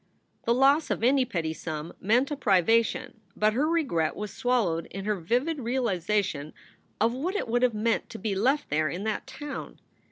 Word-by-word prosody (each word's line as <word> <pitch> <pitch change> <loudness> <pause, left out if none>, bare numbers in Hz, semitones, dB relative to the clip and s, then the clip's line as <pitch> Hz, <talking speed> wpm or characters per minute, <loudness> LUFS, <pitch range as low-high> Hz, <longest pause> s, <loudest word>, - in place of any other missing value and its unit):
The 235 - +3
loss 275 +4 +4
of - - -1
any 260 +1 +4
petty 165 -9 -2
sum 155 0 -6
meant 245 +8 +2
a - - 0
privation, 225 - +2
but 215 0 +2
her 275 +7 +1
regret 270 - +1
was 210 0 -5
swallowed 210 -10 0
in 195 +1 -7
her 210 - +1
vivid 245 - -1
realization 205 - -1 0.5
of 230 +2 +3
what 330 +10 -2
it 415 - -1
would 240 +2 +1
have 250 -3 +2
meant 225 +2 0
to - - -7
be 200 +1 -2
left 265 +9 +1
there 155 0 +2
in 180 +6 -4
that 220 +3 -2
town. 275 +1 -7
225 Hz, 185 wpm, -27 LUFS, 190-260 Hz, 0.5 s, loss